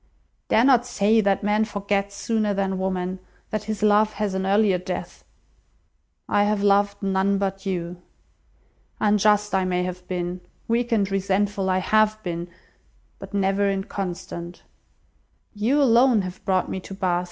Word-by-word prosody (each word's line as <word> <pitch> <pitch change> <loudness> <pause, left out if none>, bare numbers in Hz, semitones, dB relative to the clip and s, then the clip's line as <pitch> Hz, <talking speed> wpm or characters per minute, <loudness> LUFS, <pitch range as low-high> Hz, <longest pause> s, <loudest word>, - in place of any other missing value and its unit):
Dare 225 - +4
not 255 -3 +5
say 220 -1 +2
that 200 -1 +1
man 210 +1 +2
forgets 200 -1 -2
sooner 215 -1 -1
than 195 -1 -1
woman, 185 0 -2 0.3
that 215 -1 -3
his 215 0 -4
love 215 +1 +4
has 210 -2 -2
an 190 0 -2
earlier 200 -2 +3
death. 180 0 -6 1.0
I 205 - +2
have 205 -1 0
loved 200 0 +2
none 195 +1 +1
but 195 0 -3
you. 175 -1 -4 1.0
Unjust 210 0 +2
I 190 -1 +2
may 180 -1 0
have 180 0 -6
been, 180 0 -3 0.3
weak 235 +1 0
and 215 -3 +3
resentful 195 0 0
I 185 - +2
have 215 +3 +2
been, 170 -2 -4 0.7
but - - -8
never 200 0 +1
inconstant. 185 -3 -5 0.9
You 230 +7 +1
alone 240 -4 +4
have 185 0 -8
brought 185 -2 +1
me 190 - -4
to 195 +1 -9
Bath. 185 -3 0
200 Hz, 150 wpm, -23 LUFS, 185-210 Hz, 1.0 s, not